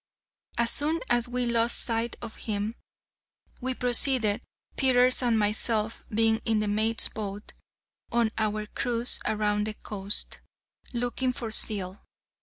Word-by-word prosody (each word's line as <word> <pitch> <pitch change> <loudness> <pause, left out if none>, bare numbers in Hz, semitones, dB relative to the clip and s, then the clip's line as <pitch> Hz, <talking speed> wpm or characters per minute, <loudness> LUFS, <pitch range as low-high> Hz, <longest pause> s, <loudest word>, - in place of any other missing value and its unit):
As 235 -1 +1
soon 315 +3 0
as 240 0 +3
we 250 0 -2
lost 235 0 +2
sight 230 0 -2
of 225 -2 -8
him 210 +1 -2 0.9
we 255 +1 -2
proceeded 245 -3 +4 0.3
(Peters 255 -1 +3
and 240 -3 +1
myself 215 +1 -1
being 225 0 +1
in 225 -1 +1
the 210 0 -1
mate's 220 +2 +1
boat) 205 -1 -7 0.6
on 235 -2 +1
our 215 -1 -2
cruise 235 +2 +3
around 210 -1 0
the 215 - -5
coast, 200 -1 -3 0.5
looking 245 +1 -2
for 230 -3 -6
seal. 200 -3 0
225 Hz, 130 wpm, -27 LUFS, 210-240 Hz, 0.9 s, proceeded